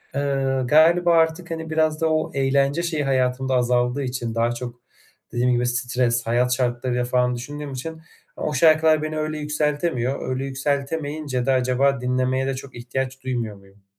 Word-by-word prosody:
Eee, 135 -2 0
galiba 170 +4 +5
artık, 160 +1 +1
hani, 160 0 -5
biraz 155 0 +1
da 160 - +2
o 155 - 0
eğlence 140 +4 +1
şeyi 160 -4 -1
hayatımda 130 0 0
azaldığı 125 +2 +1
için, 125 -3 -3
daha 115 +1 +2
çok 120 0 -7 0.5
dediğim 125 +1 +1
gibi 120 0 +1
stres, 120 -1 0
hayat 125 +2 +2
şartlarıyla 125 0 -1
falan 125 0 +1
düşündüğüm 145 +3 -6
için 160 +5 -6 0.3
o 150 - -3
şarkılar 155 +1 +4
beni 155 0 -3
öyle 155 0 -2
yükseltemiyor. 150 -3 -1
Öyle 130 +1 -2
yükseltemeyince 140 0 -2
de 135 - +2
acaba 130 +1 +2
dinlemeye 130 +1 0
de 135 - 0
çok 135 0 -9
ihtiyaç 130 +2 -4
duymuyor 120 -5 -3
muyum? 100 0 -22
130 Hz, 160 wpm, -23 LUFS, 125-150 Hz, 0.5 s, galiba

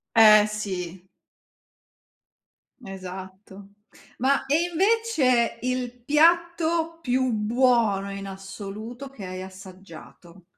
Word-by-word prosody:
Eh, 215 -2 +8
sì. 190 -4 -5 1.8
Esatto. 190 +1 -10 0.5
Ma 275 +2 +1
e 295 +5 +2
invece 345 - +2
il 250 -1 -3
piatto 330 +2 +2
più 255 -2 0
buono 220 -3 +1
in 195 0 -6
assoluto 200 +6 -8
che 230 -8 -10
hai 185 0 -6
assaggiato? 185 -2 -13
220 Hz, 85 wpm, -25 LUFS, 195-270 Hz, 1.8 s, Eh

